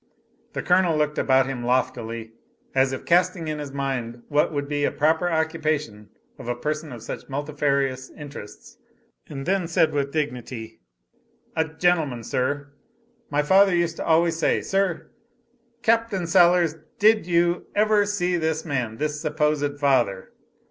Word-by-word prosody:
The -, -, -3 dB
Colonel 180 Hz, -3 st, +3 dB
looked 150 Hz, 0 st, 0 dB
about 130 Hz, 0 st, +3 dB
him 130 Hz, -2 st, -4 dB
loftily, 115 Hz, -2 st, -1 dB, 0.4 s
as 135 Hz, 0 st, +3 dB
if 130 Hz, -, -5 dB
casting 175 Hz, -1 st, +2 dB
in 155 Hz, -1 st, -3 dB
his 145 Hz, -2 st, -6 dB
mind 125 Hz, -4 st, -3 dB
what 150 Hz, +2 st, +2 dB
would 145 Hz, -2 st, -3 dB
be 145 Hz, 0 st, -1 dB
the -, -, +3 dB
proper 160 Hz, +3 st, +1 dB
occupation 155 Hz, -9 st, -1 dB, 0.3 s
of -, -, -9 dB
a 120 Hz, -, -1 dB
person 150 Hz, +4 st, -3 dB
of 120 Hz, -3 st, -9 dB
such -, -, -7 dB
multifarious 140 Hz, -2 st, -1 dB
interests 140 Hz, -8 st, -11 dB, 0.5 s
and 135 Hz, -3 st, -6 dB
then 190 Hz, -2 st, 0 dB
said 160 Hz, -1 st, +2 dB
with 140 Hz, -1 st, -1 dB
dignity: 125 Hz, -7 st, -4 dB, 0.8 s
"A 160 Hz, -, +2 dB
gentleman, 160 Hz, -6 st, 0 dB
sir. 145 Hz, +4 st, -2 dB, 0.6 s
My 145 Hz, 0 st, +1 dB
father 190 Hz, +3 st, +5 dB
used 170 Hz, -1 st, 0 dB
to -, -, -3 dB
always 165 Hz, 0 st, +2 dB
say, -, -, +2 dB
sir" 195 Hz, -3 st, -1 dB, 0.7 s
"Capt. 230 Hz, 0 st, +2 dB, 0.2 s
Sellers, 170 Hz, -1 st, +4 dB, 0.2 s
did 215 Hz, -2 st, +4 dB
you 175 Hz, 0 st, +1 dB
ever 210 Hz, -1 st, +3 dB
see 180 Hz, -4 st, 0 dB
this 160 Hz, 0 st, -1 dB
man, 125 Hz, -7 st, -2 dB
this 150 Hz, +1 st, -2 dB
supposed 150 Hz, -2 st, 0 dB
father?" 120 Hz, -10 st, +1 dB
150 Hz, 150 wpm, -24 LUFS, 135-170 Hz, 0.8 s, father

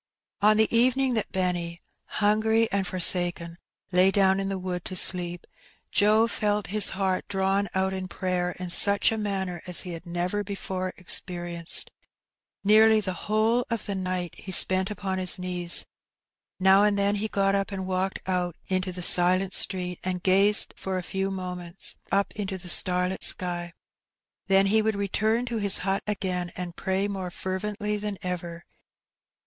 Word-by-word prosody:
On 215 Hz, +1 st, +5 dB
the 220 Hz, +1 st, +2 dB
evening 255 Hz, +2 st, +3 dB
that 220 Hz, -3 st, -2 dB
Benny, 175 Hz, -2 st, -2 dB, 0.3 s
hungry 220 Hz, +2 st, +1 dB
and 195 Hz, -1 st, 0 dB
forsaken, 175 Hz, -2 st, 0 dB, 0.3 s
lay 180 Hz, +1 st, +5 dB
down 195 Hz, -1 st, +3 dB
in 195 Hz, 0 st, -2 dB
the 195 Hz, -, -2 dB
wood 180 Hz, -1 st, -4 dB
to 185 Hz, -, -5 dB
sleep, 175 Hz, -1 st, +1 dB, 0.5 s
Joe 215 Hz, +2 st, +4 dB
felt 210 Hz, -2 st, -1 dB
his 210 Hz, -2 st, +1 dB
heart 190 Hz, -2 st, -1 dB
drawn 195 Hz, 0 st, 0 dB
out 190 Hz, 0 st, 0 dB
in 190 Hz, -1 st, -4 dB
prayer 180 Hz, 0 st, -2 dB
in 180 Hz, -1 st, -4 dB
such 200 Hz, +3 st, +4 dB
a 225 Hz, -, -2 dB
manner 190 Hz, -4 st, -3 dB
as 180 Hz, -, +5 dB
he 180 Hz, -, -6 dB
had 170 Hz, +1 st, -8 dB
never 180 Hz, +4 st, -2 dB
before 190 Hz, -2 st, -4 dB
experienced. 175 Hz, -2 st, 0 dB, 0.7 s
Nearly 220 Hz, +2 st, +6 dB
the 190 Hz, -3 st, -3 dB
whole 215 Hz, +6 st, +1 dB
of 230 Hz, -2 st, -3 dB
the 200 Hz, -, -3 dB
night 185 Hz, -2 st, -3 dB
he 190 Hz, -, -9 dB
spent 185 Hz, +1 st, +2 dB
upon 195 Hz, -2 st, -3 dB
his 185 Hz, 0 st, +3 dB
knees. 180 Hz, -1 st, -1 dB, 0.7 s
Now 190 Hz, +1 st, +5 dB
and 205 Hz, -1 st, +3 dB
then 200 Hz, +1 st, +2 dB
he 215 Hz, +2 st, -2 dB
got 195 Hz, -2 st, +1 dB
up 195 Hz, 0 st, -1 dB
and 190 Hz, -1 st, -4 dB
walked 185 Hz, +1 st, -2 dB
out 180 Hz, -2 st, -1 dB
into 185 Hz, 0 st, -1 dB
the 180 Hz, 0 st, -5 dB
silent 185 Hz, +2 st, +3 dB
street, 180 Hz, -2 st, -2 dB
and 180 Hz, -1 st, -3 dB
gazed 200 Hz, +3 st, +4 dB
for 190 Hz, -1 st, -4 dB
a 180 Hz, -, -4 dB
few 195 Hz, +1 st, -2 dB
moments 180 Hz, -2 st, -3 dB, 0.2 s
up 200 Hz, 0 st, +1 dB
into 195 Hz, -2 st, -4 dB
the 180 Hz, -1 st, -11 dB
starlit 180 Hz, +1 st, 0 dB
sky. 175 Hz, -1 st, +1 dB, 0.8 s
Then 195 Hz, 0 st, +5 dB
he 215 Hz, +3 st, +3 dB
would 220 Hz, 0 st, 0 dB
return 215 Hz, +4 st, 0 dB
to 235 Hz, -2 st, -3 dB
his 200 Hz, -2 st, +4 dB
hut 195 Hz, 0 st, 0 dB
again 185 Hz, -4 st, -2 dB
and 175 Hz, -2 st, -6 dB
pray 190 Hz, +1 st, -1 dB
more 190 Hz, -3 st, -4 dB
fer 185 Hz, +1 st, -4 dB
vently 210 Hz, 0 st, -3 dB
than 205 Hz, -1 st, -3 dB
ever. 175 Hz, -2 st, -5 dB
190 Hz, 170 wpm, -26 LUFS, 180-205 Hz, 0.8 s, Nearly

